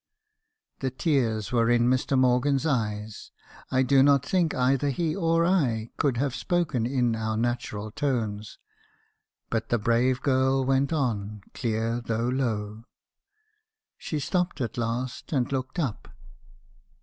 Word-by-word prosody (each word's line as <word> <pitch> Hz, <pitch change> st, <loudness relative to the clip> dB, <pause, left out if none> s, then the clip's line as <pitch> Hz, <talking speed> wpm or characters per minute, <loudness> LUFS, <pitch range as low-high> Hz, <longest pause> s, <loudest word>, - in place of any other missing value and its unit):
* 440 Hz, 0 st, -54 dB
The 135 Hz, -, -1 dB
tears 120 Hz, -, 0 dB
were 115 Hz, -1 st, +2 dB
in 120 Hz, 0 st, +4 dB
Mr. 130 Hz, +2 st, +1 dB
Morgan's 130 Hz, +3 st, +2 dB
eyes. 110 Hz, -7 st, -2 dB, 0.4 s
I 130 Hz, 0 st, +2 dB
do 135 Hz, +1 st, +4 dB
not 140 Hz, -1 st, +4 dB
think 175 Hz, -1 st, +1 dB
either 135 Hz, +2 st, +2 dB
he 155 Hz, +3 st, -1 dB
or 165 Hz, -2 st, +2 dB
I 125 Hz, -12 st, +1 dB
could 135 Hz, -5 st, +1 dB
have 135 Hz, 0 st, 0 dB
spoken 150 Hz, -9 st, 0 dB
in 125 Hz, -3 st, +1 dB
our 110 Hz, 0 st, -2 dB
natural 115 Hz, -3 st, -2 dB
tones; 110 Hz, -6 st, -2 dB, 0.9 s
but 115 Hz, -1 st, -1 dB
the 120 Hz, -, +2 dB
brave 120 Hz, +4 st, +1 dB
girl 130 Hz, -1 st, +2 dB
went 135 Hz, +2 st, +1 dB
on, 105 Hz, -9 st, -2 dB
clear 115 Hz, 0 st, -1 dB
though 115 Hz, +1 st, -1 dB
low. 110 Hz, -4 st, -2 dB, 1.1 s
She 155 Hz, -, -3 dB
stopped 180 Hz, +1 st, -1 dB
at 120 Hz, -3 st, -3 dB
last, 120 Hz, +2 st, -3 dB
and 130 Hz, -3 st, 0 dB
looked 130 Hz, +3 st, -3 dB
up. 135 Hz, -11 st, -2 dB
125 Hz, 135 wpm, -26 LUFS, 115-140 Hz, 1.1 s, in